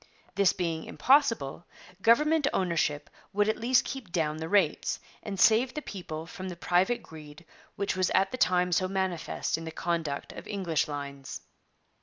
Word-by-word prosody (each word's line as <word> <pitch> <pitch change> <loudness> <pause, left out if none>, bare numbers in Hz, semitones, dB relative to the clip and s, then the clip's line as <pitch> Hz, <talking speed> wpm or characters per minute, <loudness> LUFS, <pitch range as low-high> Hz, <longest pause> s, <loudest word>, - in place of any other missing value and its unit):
This 200 -2 +4
being 165 -3 -3
impossible, 230 - +2 0.3
government 300 +7 +4
ownership 160 -5 0 0.3
would 205 +1 +2
at 220 - 0
least 245 +2 +3
keep 255 -10 -6
down 155 -3 0
the 160 +1 -5
rates, 205 -1 +2 0.2
and 200 -3 -5
save 230 +5 +4
the 300 - -2
people 160 -7 -6
from 185 +3 -7
the 180 - -6
private 180 +7 +1
greed 155 +1 -12 0.3
which 200 -1 -1
was 185 -1 +1
at 195 0 +3
the 255 - -4
time 180 0 +3
so 185 +2 +2
manifest 185 -4 -2
in - - -8
the 165 - -5
conduct 160 -3 -3
of - - -9
English 185 -7 -1
lines. 140 -2 -6
180 Hz, 165 wpm, -29 LUFS, 160-205 Hz, 0.3 s, This